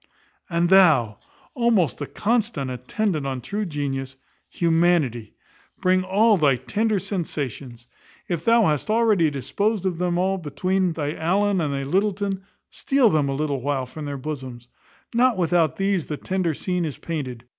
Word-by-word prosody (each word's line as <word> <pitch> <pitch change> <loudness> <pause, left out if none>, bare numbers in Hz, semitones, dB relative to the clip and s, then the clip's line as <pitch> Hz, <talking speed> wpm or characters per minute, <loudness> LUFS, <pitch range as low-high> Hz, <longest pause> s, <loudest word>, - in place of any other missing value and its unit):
And 170 0 +1
thou, 155 - +5 0.3
almost 230 - +1
the 145 - -4
constant 210 - -1
attendant 145 - -2
on 130 -1 -3
true 205 - -3
genius, 135 -3 -4 0.3
Humanity, 165 -9 +1 0.4
bring 185 0 +2
all 205 +3 +3
thy 145 -5 +3
tender 210 - -1
sensations. 145 - -4 0.4
If 170 -3 -2
thou 230 +2 +4
hast 150 +3 0
already 215 -7 +3
disposed 190 - -1
of 180 -3 -1
them 175 -1 0
all 190 +1 0
between 180 +4 -1
thy 150 -2 -3
Allen 190 +4 +1
and 150 -3 -1
thy 140 0 -2
Lyttleton, 195 +4 -1 0.3
steal 270 -6 +2
them 150 -3 +1
a 135 - -1
little 140 -2 -2
while 135 -1 -1
from 150 +4 -8
their 145 -1 -4
bosoms. 130 -4 -7 0.4
Not 245 -1 +3
without 170 -4 +2
these 195 -4 0
the 150 - -4
tender 185 -3 -1
scene 180 +1 -2
is 155 -4 -4
painted. 130 -8 -5
170 Hz, 155 wpm, -23 LUFS, 140-195 Hz, 0.4 s, thou